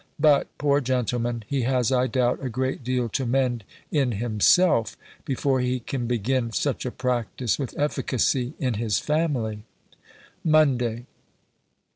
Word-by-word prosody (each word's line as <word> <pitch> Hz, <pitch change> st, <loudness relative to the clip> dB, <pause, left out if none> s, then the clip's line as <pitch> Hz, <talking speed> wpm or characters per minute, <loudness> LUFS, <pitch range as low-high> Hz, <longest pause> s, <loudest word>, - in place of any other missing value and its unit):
But, 145 Hz, -2 st, +4 dB
poor 145 Hz, 0 st, +2 dB
gentleman! 120 Hz, -2 st, -1 dB
he 140 Hz, +3 st, -1 dB
has, 125 Hz, 0 st, +1 dB
I 130 Hz, 0 st, +2 dB
doubt, 125 Hz, 0 st, 0 dB
a 130 Hz, -, -2 dB
great 130 Hz, +2 st, -2 dB
deal 125 Hz, -1 st, 0 dB
to 135 Hz, -, -2 dB
mend 125 Hz, -2 st, 0 dB, 0.3 s
in 135 Hz, -6 st, +1 dB
himself, 115 Hz, -, +3 dB, 0.3 s
before 135 Hz, -2 st, 0 dB
he 125 Hz, 0 st, 0 dB
can 120 Hz, 0 st, -4 dB
begin 120 Hz, +1 st, 0 dB
such 135 Hz, 0 st, -1 dB
a -, -, -3 dB
practice 125 Hz, -2 st, -1 dB
with 135 Hz, -4 st, -5 dB
efficacy 130 Hz, -3 st, 0 dB
in 125 Hz, -3 st, -1 dB
his 110 Hz, -3 st, +1 dB
family. 135 Hz, -9 st, -1 dB, 0.8 s
MONDAY. 125 Hz, -7 st, +2 dB
125 Hz, 135 wpm, -25 LUFS, 120-135 Hz, 0.8 s, But